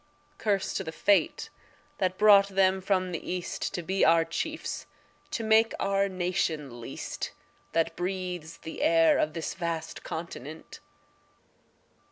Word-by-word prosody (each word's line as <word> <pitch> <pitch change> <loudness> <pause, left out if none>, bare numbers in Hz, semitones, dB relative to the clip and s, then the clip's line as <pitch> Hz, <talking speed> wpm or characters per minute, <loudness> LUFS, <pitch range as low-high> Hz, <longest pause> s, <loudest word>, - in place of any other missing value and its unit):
Curse 200 -3 0
to - - -2
the 160 - -5
fate 200 +4 +2 0.5
that 185 -1 0
brought 205 -2 +7
them 190 -1 +2
from 185 -1 +1
the 170 - -3
East 180 -1 -3
To 175 - -3
be 190 +4 0
our 165 0 +5
chiefs 310 - -4 0.4
to 230 - -3
make 220 +1 +4
our 195 0 +1
nation 165 -8 -2
least 115 - -5 0.4
That 165 0 +1
breathes 180 -2 -4
the 160 - -8
air 165 -1 +5
of 155 - +1
this 165 -1 -3
vast 170 -3 -4
continent. 160 -2 -7
180 Hz, 135 wpm, -28 LUFS, 165-195 Hz, 0.5 s, brought